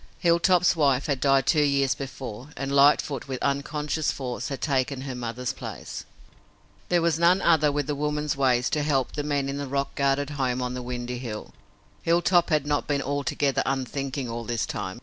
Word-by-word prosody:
Hilltop's 175 +1 +3
wife 140 -4 +2
had 140 -4 -1
died 135 -1 +3
two 155 +1 +3
years 140 -2 +2
before, 130 -2 -7
and 135 0 -3
Lightfoot, 140 -1 +3
with 130 -2 -4
unconscious 150 +2 -1
force, 125 -3 -4
had 135 -2 -4
taken 135 -2 0
her 135 -1 -5
mother's 125 0 -4
place. - - -7 0.8
There 175 -1 +3
was 165 -2 +2
none 175 +2 +5
other 160 -5 +4
with 145 -1 -2
woman's 150 0 -1
ways 130 -2 +2
to 150 - +1
help 140 -4 +1
the 150 - -3
men 145 -2 -1
in 140 +1 -3
the 140 -1 -4
rock 140 +1 -2
guarded 140 +1 0
home 130 -3 -1
on 125 0 -2
the 125 - -4
windy 125 0 -4
hill. 115 -4 -6 0.5
Hilltop 170 +1 +3
had 150 -3 +2
not 145 0 0
been 145 -1 0
altogether 140 0 0
unthinking 135 0 -2
all 115 0 -4
this 115 0 -1
time. 95 -2 -5
140 Hz, 185 wpm, -26 LUFS, 130-150 Hz, 0.8 s, none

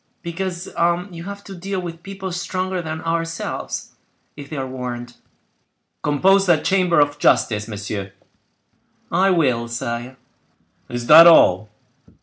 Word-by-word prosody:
"Because 175 +1 -4 0.4
you 170 0 -9
have 200 +1 -8
to 195 - -10
deal 190 +1 -4
with 170 -2 -7
people 195 0 -7
stronger 185 +1 -3
than 160 -1 -5
ourselves, 165 0 -4 0.4
if 140 -1 -10
they 155 - -6
are 135 - -2
warned." 120 -2 -7 0.8
"Compose 190 +7 +3
that 170 -4 +3
chamber 185 -3 +2
of 145 0 +1
justice, 115 -6 +2
monsieur." 100 -2 -5 1.0
"I 185 +3 +3
will, 130 -10 +1
sire." 120 +2 -5 0.7
"Is 120 0 -4
that 160 +5 +9
all?" 105 - +5
165 Hz, 130 wpm, -20 LUFS, 125-185 Hz, 1.0 s, that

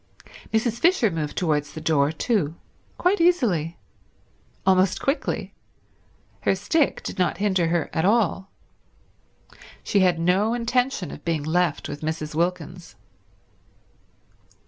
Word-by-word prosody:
Mrs. 225 +1 0
Fisher 330 - +3
moved 155 -3 -4
towards 150 -4 0
the 160 - -6
door 155 -2 +2
too; 165 - -1 0.4
quite 365 +1 +2
easily; 210 - +2 0.9
almost 190 0 +3
quickly; 275 +3 -2 0.9
her - - +1
stick 320 -4 0
did - - -6
not 180 -3 +1
hinder 190 -4 +1
her 170 0 0
at 160 - 0
all. 195 -2 +1 1.3
She 200 - +1
had 180 -3 +3
no 190 +7 +2
intention 245 - -1
of 150 - -10
being 165 -3 -1
left 165 0 0
with 145 - -7
Mrs. 155 -1 -4
Wilkins. 175 -3 -3
180 Hz, 120 wpm, -24 LUFS, 160-225 Hz, 1.3 s, Fisher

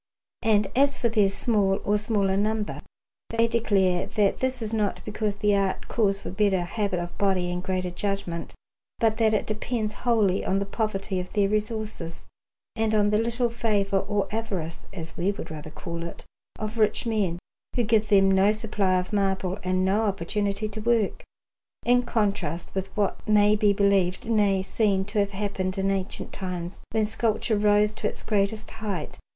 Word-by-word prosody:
And 215 -2 +3
as 280 +2 +4
for 235 - +1
their 210 -3 +3
small 200 -2 +1
or 205 - +3
smaller 205 -3 +1
number, 210 +1 -1 0.5
they 230 0 +2
declare 195 -6 +2
that 205 -2 +1
this 260 0 -1
is 220 0 -3
not 210 -3 0
because 215 -1 -2
the 205 0 +2
art 195 -1 -1
calls 200 -4 +1
for - - -6
a - - -6
better 195 -1 +2
habit 195 0 -1
of 175 0 -5
body 185 -3 +1
and 180 0 -2
greater 185 -1 -2
judgment, 180 -3 -3 0.4
but 220 -1 +2
that 220 -1 +3
it 205 - 0
depends 215 0 -2
wholly 215 -6 +1
on 190 - +1
the 200 - 0
poverty 195 -2 -2
of 180 - -6
their 205 -2 +3
resources 215 -5 -3 0.5
and 220 -1 +1
on 205 -1 +3
the 210 - +3
little 235 +1 0
favour, 205 -4 +1
or 205 0 -1
avarice, 190 -7 -3
as 165 -4 -7
we 185 +4 +1
would 200 - -7
rather 155 0 -7
call 170 +2 -6
it, 170 0 -8 0.3
of 215 +1 -4
rich 215 +3 +2
men, 205 -7 0 0.4
who 245 - +2
give 215 -1 +2
them 195 -1 +5
no 190 +2 +5
supply 210 -4 0
of 180 +4 -5
marble 195 -1 0
and 185 0 +1
no 205 +4 +2
opportunity 200 +2 -1
to 215 +1 -6
work; 225 -3 +1 0.6
in 245 +1 +5
contrast 205 -8 -1
with 190 0 -2
what 205 -2 -1
may 210 0 +5
be 210 -1 +3
believed, 200 -2 +2
nay, 205 -4 +2
seen 195 -1 +1
to 210 +1 -1
have 200 -1 +2
happened 195 -1 -3
in 195 0 +1
ancient 195 0 -3
times, 180 -1 -5
when 220 -1 +1
sculpture 220 0 0
rose 210 0 +3
to - - -2
its - - -8
greatest 210 +1 0
height. 200 -8 -5
205 Hz, 180 wpm, -26 LUFS, 190-215 Hz, 0.6 s, them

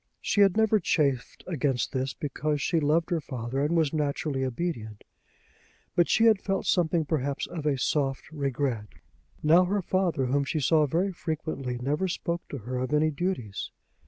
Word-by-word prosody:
She 205 - +1
had 195 0 +5
never 220 -1 +4
chafed 140 -8 0
against 145 -7 -1
this 130 0 -2
because 150 0 -2
she 165 +4 +1
loved 160 +3 +1
her 170 -2 +1
father 125 -1 -4
and 155 +4 +1
was 160 -3 +2
naturally 145 -2 -1
obedient; 120 -6 -4 0.9
but 175 -2 +3
she 225 - +4
had 220 -3 +5
felt 195 -1 -1
something 165 -2 +2
perhaps 140 -3 -1
of 160 -3 -5
a 140 -2 +2
soft 135 +1 -1
regret. 135 -6 -2 0.6
Now 165 +4 +6
her 200 +1 0
father, 175 -7 +1
whom 140 +3 +1
she 155 +3 -2
saw 150 +2 +3
very 175 +7 0
frequently, 155 -7 -4
never 145 +9 -1
spoke 170 -1 -2
to 140 - -5
her 125 +2 -5
of 130 +2 -2
any 155 +1 +3
duties. 140 - -3
150 Hz, 170 wpm, -27 LUFS, 135-170 Hz, 0.9 s, Now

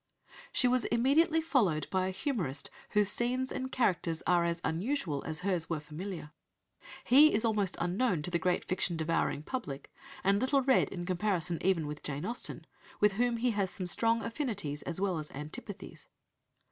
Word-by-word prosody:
She 250 - +3
was 250 0 +2
immediately 310 +7 +3
followed 205 - +1
by 185 -1 +1
a - - -1
humourist 185 - -3 0.2
whose 210 -1 +3
scenes 255 +2 0
and 260 0 -4
characters 180 -9 0
are 175 0 +3
as 170 0 -1
unusual 165 - -1
as 160 +1 -4
hers 180 -4 0
were 165 -2 -1
familiar. 155 +1 -7 0.7
He 295 +5 +7
is 220 +2 +1
almost 210 -4 0
unknown 180 0 0
to 180 - -4
the 170 - +1
great 180 +1 0
fiction 180 -2 0
devouring 160 -2 0
public, 155 - -5 0.3
and 200 +2 +3
little 270 +1 +2
read 265 0 +3
in 175 -2 -5
comparison 175 -2 0
even 180 -4 +2
with 150 0 -6
Jane 145 +3 -4
Austen, 235 +4 -4 0.3
with 210 0 +5
whom 235 +3 +1
he 245 +1 +1
has 200 -3 0
some 185 - -4
strong 225 +5 +2
affinities 210 - -3
as 175 +1 -3
well 190 -4 0
as 150 - -6
antipathies. 185 - -8
190 Hz, 170 wpm, -31 LUFS, 165-240 Hz, 0.7 s, He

